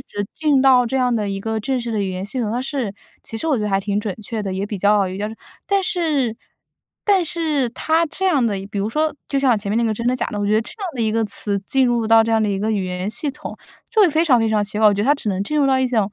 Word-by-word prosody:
词 205 -1 -5
进 300 -4 +2
到 260 -2 +5
这 265 +3 -1
样 250 -1 +2
的 210 -2 -1
一 195 - -3
个 220 +2 -2
正 250 +3 -1
式 235 - -4
的 215 -2 -1
语 195 - -2
言 185 +1 -4
系 255 - -4
统， 220 -2 -1
它 245 - -1
是 260 -6 -3 0.3
其 225 - -6
实 325 - -2
我 295 -5 +2
觉 215 - -2
得 210 - -1
还 195 0 +2
挺 200 0 -1
准 210 -2 -3
确 220 +1 -4
的， 195 -2 -3
也 190 +2 -2
比 205 - -4
较 200 0 +3
有 185 - -6
价值。 210 +2 -4 0.3
但 395 -1 +2
是 310 - 0 0.7
但 390 -4 +3
是 310 -6 0
它 320 +6 +1
这 380 +5 -4
样 285 -10 +3
的 215 - 0 0.2
比 205 - -4
如 200 +2 -1
说 305 +6 0
就 275 - -1
像 260 -4 +3
前 205 -1 -5
面 210 - 0
那 235 - +2
个 225 - +1
真 230 +3 -4
的 250 - +2
假 255 - -2
的， 210 - -5
我 205 - -1
觉 205 - +1
得 215 - +4
这 225 - -6
样 390 - -2
的 245 - -4
一 220 - +1
个 225 +1 +1
词 205 -1 -2
进 260 +6 +1
入 235 -2 +1
到 225 0 +6
这 225 - -2
样 225 -1 +3
的 215 - +1
一 195 -1 -1
个 215 +3 -1
语 205 -3 0
言 180 +1 -3
系 285 +5 -2
统， 300 +3 -9 0.3
就 450 -2 +2
会 380 - +6
非 315 +3 +2
常 260 -7 +4
非 225 -1 +1
常 215 -1 +2
奇 210 +1 -3
怪， 215 - +5
我 205 - +5
觉 200 - -1
得 225 - -1
它 290 - +6
只 275 - -4
能 195 -1 -1
进 300 +9 -1
入 285 - +3
到 265 -1 +3
一 260 - +1
种， 245 -2 0
225 Hz, 350 characters per minute, -20 LUFS, 205-275 Hz, 0.7 s, 到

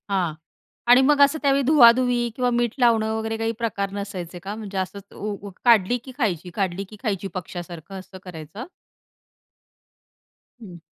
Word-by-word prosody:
हां. 185 -5 0 0.5
आणि 245 +2 +7
मग 285 +2 +4
असं 285 +3 +5
त्यावेळी 280 -1 +3
धुवा-धुवी 245 -3 +5
किंवा 250 -1 +1
मीठ 240 -1 0
लावणं 225 -3 +3
वगैरे 220 0 -3
काही 225 0 -1
प्रकार 200 -4 -2
नसायचे 190 -4 -6
का? 195 +4 -6
म्हणजे 205 -3 -7
असं 190 +2 -3 0.2
ऊ 205 -1 -5 0.2
काढली 230 -1 +5
की 260 - -10
खायची, 185 - -1
काढली 195 -2 -1
की 215 - -11
खायची, 200 -4 -2
पक्ष्यासारखं 175 0 -7
असं 190 0 -12
करायचं? 175 - -8 2.0
हं. 180 -6 -11
210 Hz, 150 wpm, -23 LUFS, 190-240 Hz, 2.0 s, आणि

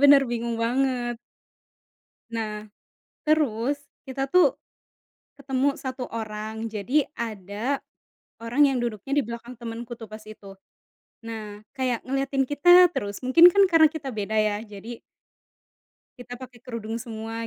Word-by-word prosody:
benar, 285 0 +8
bingung 235 0 -2
banget. 245 -1 0 1.1
Nah, 215 -2 -4 0.6
terus 285 -4 +2 0.3
kita 270 +1 -3
tuh 365 +7 +5 0.8
ketemu 275 0 0
1 260 -2 -5
orang, 220 0 -5
jadi 245 +8 +1 0.2
ada, 220 +4 -3 0.6
orang 245 +5 +3
yang 260 - 0
duduknya 235 +1 -4
di - - +4
belakang 235 +1 -8
temanku 235 0 -7
tuh 225 - -8
pas 215 +1 -10
itu. 210 -2 -12 0.7
Nah, 215 -2 -7
kayak 255 -3 -1
ngeliatin 270 +1 0
kita 350 +6 +6
terus, 205 -10 -4
mungkin 260 +7 +7
kan 400 - +5
karena 325 -2 +7
kita 300 -3 -6
beda 215 -1 -3
ya, 215 -1 +2
jadi 215 +3 -9 1.2
kita 245 0 -8
pakai 250 0 -11
kerudung 230 -2 -5
semua 225 0 -5
235 Hz, 125 wpm, -25 LUFS, 220-270 Hz, 1.2 s, benar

